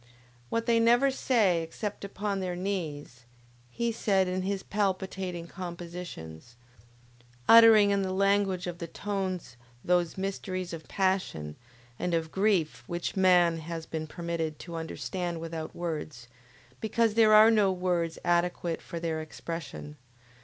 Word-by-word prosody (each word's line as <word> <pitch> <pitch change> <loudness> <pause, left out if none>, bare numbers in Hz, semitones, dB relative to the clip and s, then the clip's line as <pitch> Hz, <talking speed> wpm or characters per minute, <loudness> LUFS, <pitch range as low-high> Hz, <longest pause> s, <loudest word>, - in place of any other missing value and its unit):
What 230 0 -1
they 230 -1 +3
never 240 +4 +4
say 215 -10 +2
except 200 +6 -5
upon 200 0 -3
their 180 -2 -3
knees, 155 -9 -4 0.4
he 235 - -1
said 195 -4 +1
in 185 +1 -1
his 195 +1 -2
palpitating 190 -3 -2
compositions; 170 - -8 0.9
uttering 225 -3 +8
in 200 0 +2
the 190 -1 -2
language 195 -1 +1
of 175 -1 -5
the 170 - -5
tones 185 -8 -4 0.3
those 175 -1 +1
mysteries 185 -2 -3
of 160 -1 -8
passion 185 - -1 0.4
and 175 -1 0
of 160 -1 -2
grief 190 -6 +1
which 175 0 -3
man 180 -3 +4
has 165 0 -6
been 160 -1 -5
permitted 165 -2 -3
to 170 - -9
understand 165 +2 -4
without 160 -1 -6
words, 155 -7 -5 0.5
because 225 0 +1
there 220 -1 +6
are 215 +1 +8
no 210 -3 +4
words 180 -3 -1
adequate 175 -1 0
for 170 - -6
their 165 -1 -2
expression. 155 -1 -7
180 Hz, 135 wpm, -29 LUFS, 165-200 Hz, 0.9 s, uttering